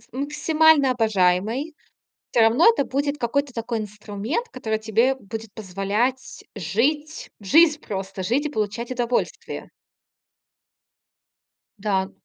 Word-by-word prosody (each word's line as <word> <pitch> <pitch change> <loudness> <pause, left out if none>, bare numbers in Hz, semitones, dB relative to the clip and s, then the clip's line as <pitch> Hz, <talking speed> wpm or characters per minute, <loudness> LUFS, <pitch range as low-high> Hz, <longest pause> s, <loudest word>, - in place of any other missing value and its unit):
с - - -25
максимально 300 +1 +3
обожаемой, 220 - +1 0.6
всё 235 - +3
равно 235 - +6
это 455 -12 +2
будет 285 +2 -1
какой-то 280 +3 -1
такой 230 0 -3
инструмент, 210 - -4
который 220 -4 -3
тебе 225 +5 +2
будет 225 -3 -8
позволять 210 +6 -2
жить 290 - -1
в 205 - -17
жизнь 310 - +5
просто, 195 -1 -5
жить 255 +9 0
и 300 - 0
получать 220 +1 -3
удовольствие. 245 -1 -2 2.1
Да. 195 -2 0
235 Hz, 115 wpm, -23 LUFS, 210-280 Hz, 2.1 s, равно